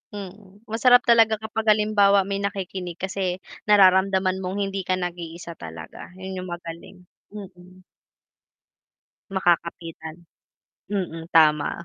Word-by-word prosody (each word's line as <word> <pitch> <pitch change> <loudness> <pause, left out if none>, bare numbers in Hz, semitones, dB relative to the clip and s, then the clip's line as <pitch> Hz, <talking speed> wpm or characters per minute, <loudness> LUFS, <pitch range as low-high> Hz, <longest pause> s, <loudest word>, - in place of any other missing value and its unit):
Mm. 195 0 -10 0.2
Masarap 245 +2 +5
talaga 225 -2 +5
kapag 220 +1 -5
halimbawa 205 -2 +4
may 200 0 -3
nakikinig, 190 -3 -4
kasi 185 0 -3 0.3
nararamdaman 190 -1 +4
mong 185 +2 -4
hindi 195 0 -3
ka 185 - +2
nag-iisa 170 -1 -6
talaga, 80 - -10
'yun 190 0 -7
'yung 185 - -8
magaling. 170 +2 -8 0.3
Mm. 185 -2 -13 1.5
Makakapitan. 170 -3 -1 0.8
Mm, 165 -5 -4
tama. 155 -2 +4
185 Hz, 105 wpm, -23 LUFS, 175-200 Hz, 1.5 s, Masarap